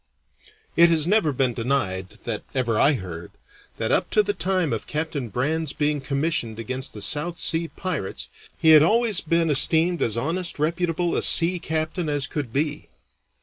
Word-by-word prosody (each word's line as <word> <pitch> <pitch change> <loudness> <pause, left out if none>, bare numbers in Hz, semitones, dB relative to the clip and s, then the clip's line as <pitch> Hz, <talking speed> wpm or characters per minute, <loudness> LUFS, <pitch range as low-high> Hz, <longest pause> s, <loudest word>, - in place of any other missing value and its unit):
It 170 0 +7
has 160 -2 +2
never 190 -4 +2
been 130 -2 +1
denied, 115 -7 -2
that - - -3
ever 120 -4 0
I 150 - +5
heard, 90 - -7 0.4
that - - -1
up - - +1
to 210 - +3
the 205 0 -1
time 180 - -1
of 115 - -4
Captain 150 -5 -3
Brand's 150 +7 -1
being 150 -1 -1
commissioned 140 -4 -2
against 130 +3 -5
the 105 - -2
South 150 +9 +1
Sea 165 +1 +2
pirates 160 - -4 0.3
he 160 - +4
had 155 -1 +9
always 215 +4 +2
been 165 0 +1
esteemed 160 +4 +2
as 115 0 0
honest, 170 +8 -2
reputable 170 +2 -1
a - - +1
sea 175 +2 +3
captain 160 +1 -2
as 145 -2 0
could 140 -6 -5
be. 145 +3 -2
155 Hz, 170 wpm, -23 LUFS, 130-170 Hz, 0.4 s, had